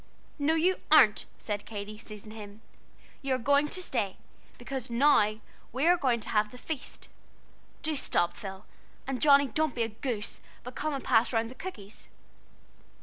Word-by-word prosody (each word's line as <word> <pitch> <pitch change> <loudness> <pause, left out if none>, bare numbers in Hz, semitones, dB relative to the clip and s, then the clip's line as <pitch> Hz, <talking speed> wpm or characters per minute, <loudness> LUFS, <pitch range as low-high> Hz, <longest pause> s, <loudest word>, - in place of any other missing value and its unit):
"No, 300 +3 +2
you 360 +3 +3
aren't," 260 -10 +6
said 205 -1 -4
Katy, 210 0 -6
seizing 215 -1 -10
him, 210 -1 -10 0.6
"you 270 -2 0
are - - 0
going 280 +4 +3
to 370 +5 -4
stay, 215 - -2 0.4
because 255 0 -5
now 235 -4 +4 0.4
we 265 +5 0
are 350 +1 +6
going 260 -8 +1
to - - -5
have 210 0 +2
the 250 - -12
Feast! 290 +1 -7 0.8
Do 310 -1 -1
stop, 175 -10 0
Phil; 195 0 -8 0.4
and 265 -1 -3
Johnnie, 280 -2 +6
don't 310 +2 0
be 235 - +1
a 225 - -2
goose, 225 -1 -4 0.2
but 250 - -8
come 305 +2 -2
and 270 - -5
pass 230 -1 +3
round 225 -1 0
the - - -8
cookies." 220 - -9
245 Hz, 170 wpm, -29 LUFS, 215-285 Hz, 0.8 s, aren't